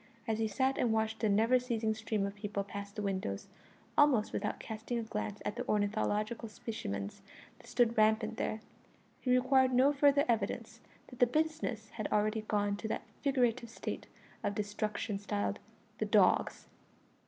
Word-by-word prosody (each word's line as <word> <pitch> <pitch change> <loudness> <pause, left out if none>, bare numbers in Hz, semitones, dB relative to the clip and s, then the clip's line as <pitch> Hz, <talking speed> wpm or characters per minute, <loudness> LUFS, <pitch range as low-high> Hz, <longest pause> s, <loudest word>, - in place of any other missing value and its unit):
As 220 -1 0
he 220 - +2
sat 260 +6 +1
and 235 - +2
watched 220 0 0
the 220 - +2
never 225 +5 +4
ceasing 230 -3 0
stream 215 -2 -1
of 200 - -3
people 205 -1 -3
pass 200 0 -7
the 210 +1 -5
windows, 190 - -2 0.5
almost 290 -8 +4
without - - -2
casting 220 +2 -4
a 230 - -1
glance 210 -2 -4
at 210 +3 -2
the - - -4
ornithological 215 +2 0
specimens 100 - -5 0.4
that - - -16
stood 235 -1 +2
rampant 220 +1 +3
there, 215 - -2 0.6
he 255 - -4
required 260 0 +4
no 270 +3 +5
further 285 0 +4
evidence 225 -4 -1 0.3
that 250 - -13
the 245 - +6
business 305 -6 -1
had 215 -3 -3
already 215 +1 +2
gone 205 -1 0
to 220 - -4
that 220 - -3 0.2
figurative 250 -4 +1
state 230 - -5 0.4
of 205 -1 -1
destruction 210 0 -2
styled 100 - -2 0.4
"the - - +1
dogs." - - +3
220 Hz, 165 wpm, -33 LUFS, 205-245 Hz, 0.6 s, the